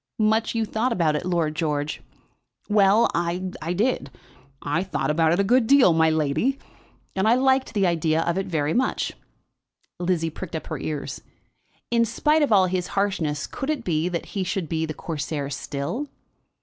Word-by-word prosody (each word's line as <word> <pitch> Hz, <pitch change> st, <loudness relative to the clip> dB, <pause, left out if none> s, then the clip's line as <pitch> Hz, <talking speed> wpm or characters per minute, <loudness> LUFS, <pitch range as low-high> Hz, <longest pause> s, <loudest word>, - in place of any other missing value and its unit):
"Much 220 Hz, +2 st, +1 dB
you 225 Hz, -1 st, +1 dB
thought 225 Hz, +4 st, -1 dB
about 165 Hz, -7 st, +1 dB
it, 160 Hz, +4 st, -3 dB
Lord 165 Hz, -4 st, 0 dB
George." 150 Hz, -2 st, -2 dB, 0.7 s
"Well; 210 Hz, +2 st, +4 dB
I 170 Hz, +1 st, 0 dB, 0.4 s
did. 210 Hz, -, 0 dB, 0.5 s
I 145 Hz, +4 st, -1 dB
thought 190 Hz, -4 st, -1 dB
about 160 Hz, +1 st, +3 dB
it 175 Hz, -, +2 dB
a -, -, +4 dB
good 240 Hz, +3 st, +3 dB
deal, 270 Hz, -10 st, +6 dB
my 160 Hz, 0 st, +4 dB
lady. 155 Hz, -, +1 dB, 0.6 s
And 190 Hz, +2 st, +1 dB
I 230 Hz, -, +5 dB
liked 265 Hz, -1 st, +2 dB
the 200 Hz, -2 st, +3 dB
idea 165 Hz, -2 st, +1 dB
of 170 Hz, 0 st, 0 dB
it 195 Hz, +1 st, -2 dB
very 155 Hz, -3 st, 0 dB
much." 260 Hz, +1 st, 0 dB, 0.9 s
Lizzie 175 Hz, -2 st, 0 dB
pricked 165 Hz, +1 st, -7 dB
up 160 Hz, -, -4 dB
her -, -, -5 dB
ears. 150 Hz, -2 st, -4 dB, 0.7 s
In 235 Hz, -1 st, +4 dB
spite 300 Hz, +7 st, +2 dB
of 290 Hz, -, +2 dB
all 195 Hz, -3 st, +6 dB
his 180 Hz, 0 st, -1 dB
harshness, 165 Hz, -7 st, 0 dB
could 270 Hz, -, -5 dB
it 300 Hz, -6 st, -1 dB
be 165 Hz, -2 st, 0 dB
that 170 Hz, -2 st, -3 dB
he 195 Hz, -, -1 dB
should 185 Hz, -2 st, -2 dB
be 160 Hz, +1 st, -1 dB
the 155 Hz, -, -5 dB
Corsair 145 Hz, -3 st, -4 dB
still? 145 Hz, -, -4 dB
180 Hz, 175 wpm, -24 LUFS, 160-220 Hz, 0.9 s, deal